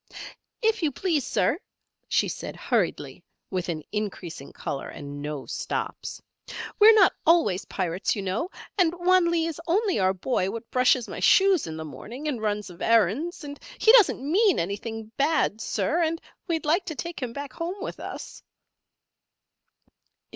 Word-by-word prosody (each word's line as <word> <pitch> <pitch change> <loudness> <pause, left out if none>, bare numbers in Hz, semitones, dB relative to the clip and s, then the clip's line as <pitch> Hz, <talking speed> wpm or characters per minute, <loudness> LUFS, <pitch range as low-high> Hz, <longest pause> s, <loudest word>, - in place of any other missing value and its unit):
"If 445 -1 +2
you 310 -3 +1
please, 305 -2 -1
Sir," 305 - +1 0.5
she - - +2
said, - - -6
hurriedly, - - -1 0.3
with 185 -1 -2
an 155 -3 -3
increasing 190 -8 -5
colour 135 - -5
and 145 0 -8
no 150 -1 -5
stops, - - -4 0.6
"we're 435 +1 +9
not 390 -4 +6
always 310 - +3
pirates, 180 0 -1
you 200 - -4
know, 195 - -2 0.3
and 345 -2 +3
Wan 355 0 +4
Lee 335 -1 +1
is 330 -1 -4
only 390 - +2
our 190 0 +2
boy 190 -1 0
what 230 +2 -7
brushes 250 -1 +3
my - - -6
shoes 385 - +5
in 160 0 -5
the 160 - -5
morning, 225 - -8
and 255 -7 -2
runs 210 -2 -2
of 170 - -14
errands, 230 - +2
and 285 0 -8 0.2
he 445 - +6
doesn't 440 - +5
mean 380 +7 +3
anything 215 +4 -4
bad, 280 -7 +1
Sir, 265 - 0
and 325 0 0 0.3
we'd 325 -3 -1
like 330 +6 +2
to 320 -4 -5
take 340 +1 -5
him 250 -2 -3
back 280 +1 -7
home 345 +7 -4
with - - -6
us." - - -8
270 Hz, 160 wpm, -26 LUFS, -, 0.6 s, we're